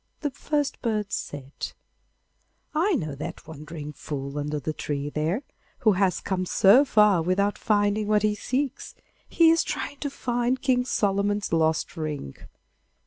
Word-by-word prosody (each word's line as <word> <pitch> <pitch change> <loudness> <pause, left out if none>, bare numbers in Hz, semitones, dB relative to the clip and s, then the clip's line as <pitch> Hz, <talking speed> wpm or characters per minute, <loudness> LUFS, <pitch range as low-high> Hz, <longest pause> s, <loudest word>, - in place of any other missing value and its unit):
The 290 -2 -1
first 290 +1 -2
bird 215 -4 -1
said: 140 -1 -5 1.0
'I 350 +7 +2
know 155 - -2
that 140 - -7
wandering 150 -1 -8
fool 140 0 -5
under 150 +1 -2
the 155 +3 -3
tree 145 -1 -3
there, 160 - -1 0.4
who 220 -4 +5
has 190 -1 +1
come 185 -1 -2
so 205 +11 +6
far 210 - +4
without 195 +4 +1
finding 205 0 +1
what 210 -1 +3
he 210 -1 +3
seeks. 260 +5 -3 0.3
He 330 -1 +5
is 330 - +3
trying 285 - -4
to 285 - -2
find 245 -1 -1
King 250 -2 +2
Solomon's 205 -3 0
lost 160 0 +1
ring. 150 - -4
200 Hz, 145 wpm, -26 LUFS, 155-245 Hz, 1.0 s, so